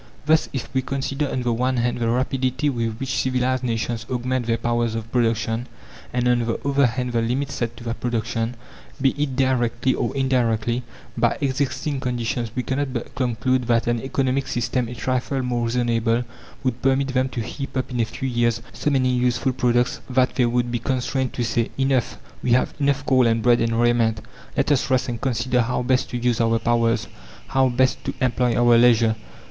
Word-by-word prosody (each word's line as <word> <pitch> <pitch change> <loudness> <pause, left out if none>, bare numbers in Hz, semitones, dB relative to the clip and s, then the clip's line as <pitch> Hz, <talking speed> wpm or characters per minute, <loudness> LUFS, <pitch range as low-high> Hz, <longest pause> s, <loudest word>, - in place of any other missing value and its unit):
Thus, 155 +1 +3
if 130 - -4
we 130 - +2
consider 135 +2 -2
on 130 - -2
the 120 -1 +1
one 125 +2 0
hand 120 0 0
the 115 -1 0
rapidity 130 +3 0
with 115 -3 -2
which 135 +1 -2
civilized 130 0 0
nations 115 -1 -2
augment 125 -1 -1
their 115 0 +2
powers 120 -1 0
of 115 0 -5
production, 115 0 0 0.4
and 125 0 0
on 125 0 +3
the 115 +3 -2
other 140 -1 +4
hand 125 +1 -2
the 115 - +2
limits 130 +5 -1
set 120 -1 -3
to 120 - -10
that 115 0 -4
production, 115 0 -2 0.4
be 135 -1 +4
it 145 -2 -2
directly 130 -1 +1
or - - -1
indirectly, 120 -3 +1 0.3
by 120 0 +2
existing 140 +1 -1
conditions, 120 -2 -2
we 125 - -1
cannot 135 +1 -1
but 120 - -5
conclude 125 0 0
that 115 -1 +2
an 120 -1 0
economic 135 0 0
system 120 0 -1
a 120 - -7
trifle 130 +2 -1
more 120 -1 -1
reasonable 115 0 +1 0.4
would 125 -2 -1
permit 135 +1 +2
them 130 0 +1
to 125 - -5
heap 135 +4 -5
up 130 0 -2
in 125 - -2
a 115 - +3
few 125 +4 -5
years 120 -2 +1
so - - -1
many 130 -3 +2
useful 125 +1 +1
products 120 0 +1
that 130 0 +2
they 125 -2 +2
would 120 0 0
be 120 - -1
constrained 130 +1 -1
to 120 - -2
say 115 0 0
"Enough! 135 -3 +1 0.2
We 120 - +2
have 130 - +2
enough 140 -1 +1
coal 130 -4 +4
and 115 -1 +1
bread 120 -1 +4
and 115 0 +1
raiment! 115 -2 +2 0.4
Let 145 +1 +2
us 140 -2 +2
rest 130 -1 +1
and 115 -2 -4
consider 125 -1 +1
how 125 +1 -1
best 130 +1 +1
to 125 - -3
use 120 -1 +1
our 115 0 +3
powers, 115 0 +1 0.4
how 135 -1 +3
best 130 +1 +1
to - - -3
employ 125 -1 +1
our 120 -1 +5
leisure." 115 -2 +5
125 Hz, 195 wpm, -23 LUFS, 115-130 Hz, 0.4 s, our